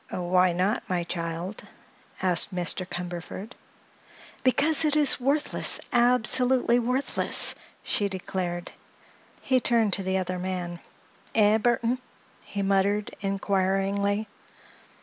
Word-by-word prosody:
"Why 180 0 +1
not, 185 +6 -1
my 180 -2 -1
child?" 170 +3 -5 0.6
asked 180 +1 +3
Mr. 180 +1 -2
Cumberford. 180 +4 -7 0.9
"Because 295 +5 +4
it 305 -1 +1
is 290 -4 +4
worthless—absolutely 250 -3 +2
worthless!" 250 +3 +1 0.3
she 205 -1 -1
declared. 180 -2 -5 0.7
He 260 -1 +2
turned 230 -4 +2
to 195 - +2
the 190 0 -1
other 185 -1 -3
man. 180 -2 -4 0.6
"Eh, 215 0 +4
Burthon?" 240 +2 0 0.4
he 200 -1 -5
muttered, 200 +1 0
inquiringly. 195 +1 -1
200 Hz, 100 wpm, -26 LUFS, 185-240 Hz, 0.9 s, Because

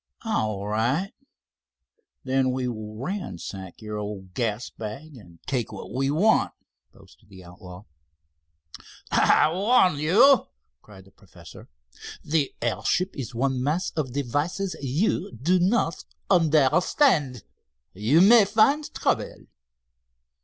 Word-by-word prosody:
"All 110 - -2
right, 125 - -1 1.1
then 130 0 +1
we 130 0 -2
will 110 -3 -6
ransack 100 - -7
your 105 0 -5
old 100 -3 -7
gas 115 +1 -3
bag 135 +8 -8
and 90 -8 -15
take 125 -4 -2
what - - -9
we 135 +1 0
want," 190 +10 +2 0.4
boasted - - -21
the 95 -2 -14
outlaw. 90 +2 -12 1.3
"I 155 - +4
warn 190 - +3
you," 215 - +5 0.3
cried 95 -3 -16
the 95 - -20
professor. - - -16 0.5
"The 150 -3 0
airship 180 - -1
is 120 -4 -7
one 130 +1 -1
mass 155 +7 -1
of 145 -5 -3
devices 145 +9 -2
you 140 - -1
do 165 +11 +1
not 180 -2 0 0.3
understand. 155 - +2 0.5
You 115 - +3
may 215 +2 +7
find 275 +9 +2
trouble." - - -2
135 Hz, 115 wpm, -25 LUFS, 110-180 Hz, 1.3 s, may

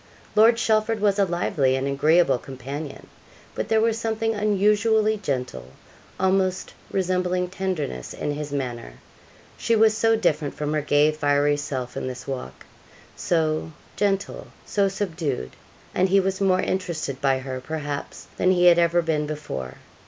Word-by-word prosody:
Lord 225 +2 +6
Chelford 220 -1 +1
was 205 -1 +2
a 200 - +5
lively 170 -6 +1
and 135 0 -1
agreeable 145 0 +3
companion; 135 +3 -7 0.5
but - - -3
there 220 - +4
was 225 0 +1
something 225 0 -1
unusually 210 +1 +2
gentle, 125 - -4 0.5
almost 190 0 +1 0.2
resembling 180 -1 0
tenderness, 180 - -3
in 150 - -3
his 145 0 -5
manner. 120 - -4 0.7
She 230 - +2
was 220 0 +4
so 225 +1 +3
different 155 -9 0
from 150 0 -2
her 155 - +1
gay, 145 +1 +3
fiery 145 -1 +2
self 135 -3 -4
in - - -3
this 125 -1 -7
walk 125 - -6 0.5
so 160 -1 0 0.2
gentle; 200 -1 -1 0.2
so 200 -1 +1
subdued 165 - -3 0.4
and 185 +1 +2
he 195 +1 +5
was 190 0 -1
more 185 -1 +3
interested 170 -7 -3
by 135 -2 +2
her, 130 -1 -5
perhaps, 145 0 -5
than 185 - +2
he 180 -1 +3
had 175 -1 +7
ever 170 0 +3
been 155 -2 0
before. 105 - -5
170 Hz, 150 wpm, -24 LUFS, 145-195 Hz, 0.7 s, had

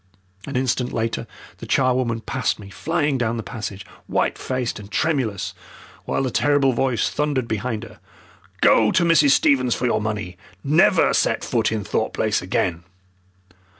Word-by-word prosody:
An 140 - -6
instant 125 -1 0
later 115 0 -2 0.3
the - - -8
charwoman 125 -3 +1
passed 125 +1 -1
me, 100 -2 -12
flying 150 -2 -1
down 120 -1 0
the 115 - -4
passage, 105 -4 -6 0.2
white - - 0
faced 130 -4 -3
and 100 -1 -11
tremulous, 110 - -1 0.5
while - - -1
the 130 - -1
terrible 145 -1 +2
voice 125 -1 +1
thundered 145 -5 -1
behind 110 +1 -3
her. 115 - -12 0.6
"Go - - +5
to 175 - +2
Mrs. 165 -4 +5
Stevens 130 -3 +3
for 125 - -2
your 120 - +1
money! 105 -4 -4 0.3
Never 150 +4 +4
set - - +1
foot - - 0
in 110 -2 -2
Thorpe - - -1
Place - - 0
again!" 85 -1 -1
125 Hz, 155 wpm, -22 LUFS, 110-135 Hz, 0.6 s, Go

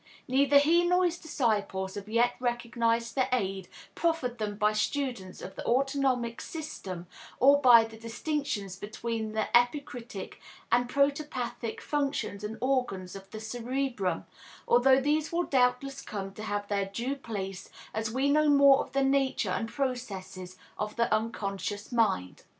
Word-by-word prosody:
Neither 280 +2 +4
he 325 +5 +5
nor 360 +1 +3
his 350 0 -1
disciples 205 -10 -1
have 205 +1 -7
yet 235 +2 +3
recognized 235 -1 0
the 260 -2 +1
aid 195 -6 -1 0.3
proffered 320 -8 -1
them 210 -1 -2
by 210 0 +2
students 215 -4 -2
of 190 - -7
the - - -6
autonomic 260 -2 +1
system 195 - -6 0.3
or 280 +2 +6
by 240 -4 +8
the 225 0 -9
distinctions 230 - -3
between 220 +1 -4
the 220 -1 0
epicritic 245 -4 0 0.3
and 245 0 +3
protopathic 280 -5 -1
functions 280 -8 -2
and 215 +1 -4
organs 245 -9 -1
of 195 0 -10
the 215 - -7
cerebrum, 235 -4 -2 0.4
although 260 +2 +5
these 295 +3 0
will 345 +1 +1
doubtless 265 0 +1
come 195 -2 -6
to 215 - -9
have 205 -1 -3
their 200 -1 0
due 235 +8 -3
place 195 -7 -6 0.2
as 220 0 -2
we 260 +5 0
know 300 +1 +4
more 280 -1 +7
of - - -5
the 275 0 +2
nature 270 0 +1
and 225 -1 -2
processes 200 -9 -4 0.2
of 210 0 -3
the 235 -2 +1
unconscious 205 -2 -2
mind. 210 - +1
240 Hz, 150 wpm, -29 LUFS, 210-275 Hz, 0.4 s, by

